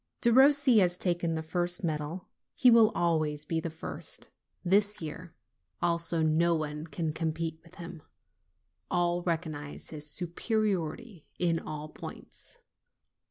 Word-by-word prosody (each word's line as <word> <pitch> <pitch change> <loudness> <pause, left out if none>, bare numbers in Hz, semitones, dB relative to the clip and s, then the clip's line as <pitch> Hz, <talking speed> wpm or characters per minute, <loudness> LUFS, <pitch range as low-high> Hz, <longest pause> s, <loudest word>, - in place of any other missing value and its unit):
Derossi 265 0 +6
has 180 -2 +2
taken 175 -3 +1
the 160 - -3
first 175 +2 -1
medal; 160 +2 -3 0.3
he 250 - +6
will 230 -2 +7
always 155 -3 0
be 165 +1 -1
the 165 - -4
first. 160 0 -8 0.3
This 205 +3 +3
year 165 +2 -7 0.4
also 170 -1 +2
no 165 +2 +3
one 155 0 -4
can 160 -2 -3
compete 160 0 -3
with 170 +1 -17
him; 170 -2 -9 0.9
all 175 0 +1
recognize 160 -4 -4
his 150 -1 -5
superiority 190 - -2
in 170 -2 +1
all 155 0 -6
points. 320 - -10
170 Hz, 125 wpm, -29 LUFS, 160-180 Hz, 0.9 s, will